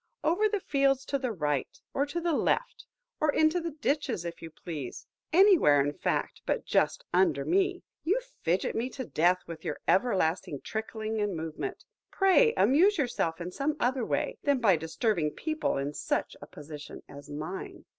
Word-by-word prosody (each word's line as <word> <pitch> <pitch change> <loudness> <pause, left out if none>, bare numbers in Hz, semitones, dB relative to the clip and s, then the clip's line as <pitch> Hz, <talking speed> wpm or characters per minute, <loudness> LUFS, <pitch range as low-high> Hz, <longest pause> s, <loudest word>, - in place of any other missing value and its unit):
Over 405 +7 +3
the 415 -1 0
fields 275 -5 +1
to 275 - -1
the 255 -2 -2
right 150 - -1
hand, - - -22
or 280 +1 +1
to 340 +4 -3
the 340 -1 0
left; - - 0 0.3
or 305 -1 +3
into 315 +4 +3
the 335 - -3
ditches, 285 - -1
if 170 0 -6
you 165 - -7
please; 155 -5 -7 0.3
anywhere, 350 - +6
in 145 +1 +1
fact, - - -2
but - - 0
just - - +1
under 355 -4 +3
me. 375 +1 +1 0.2
You 390 +9 +2 0.2
fidget 175 +3 0
me 240 +3 -1
to 260 - -3
death 180 +1 +2
with 165 -1 -9
your 150 - -3
everlasting 185 - +1
trickling 220 0 -3
and 205 -4 -1
movement. 160 - -5 0.2
Pray 435 +5 +4
amuse 365 +9 +5
yourself 240 - -1
in 175 +1 -5
some 295 +8 -1
other 255 0 +1
way, 290 +5 -1
than 285 -1 +2
by 205 -7 +5
disturbing 160 +2 0
people 310 - -1
in 140 +2 -2
such - - -2
a - - -9
position 150 0 -10
as 145 0 -12
mine. 155 +6 -6
235 Hz, 175 wpm, -29 LUFS, -, 0.3 s, anywhere